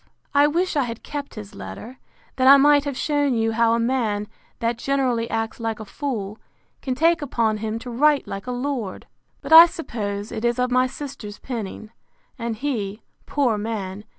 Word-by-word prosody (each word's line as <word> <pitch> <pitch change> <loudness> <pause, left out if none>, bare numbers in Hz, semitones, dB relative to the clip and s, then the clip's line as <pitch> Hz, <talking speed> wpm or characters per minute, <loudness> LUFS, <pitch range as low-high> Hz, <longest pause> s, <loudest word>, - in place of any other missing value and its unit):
I 285 +1 +5
wish 345 +4 0
I 285 -3 +2
had 230 -1 -7
kept 285 -1 -6
his 105 -1 -9
letter, 100 - -9 0.4
that 260 0 +3
I 280 +1 +10
might 290 +1 +5
have 280 -3 -3
shewn 290 -3 +1
you 225 0 +1
how 230 0 +3
a - - 0
man, 230 -4 0 0.3
that 230 0 -1
generally 250 -4 0
acts 225 0 -3
like 225 -1 -3
a 220 - -7
fool, 215 -4 -4 0.4
can 260 -2 -2
take 330 +4 +3
upon 230 -6 0
him 220 +1 -3
to 245 +2 -7
write 290 +4 +3
like 195 +4 -6
a - - -2
lord. 245 -5 -3 0.4
But - - -1
I 330 +1 +12
suppose 210 -11 -5
it 220 - -5
is 240 0 +1
of 250 0 0
my 255 +1 +3
sister's 255 -6 -8
penning, 220 -3 -6 0.5
and 230 -1 -3
he, 215 -5 -3 0.2
poor 250 -7 +1
man! 205 -2 -4
235 Hz, 185 wpm, -23 LUFS, 220-275 Hz, 0.5 s, I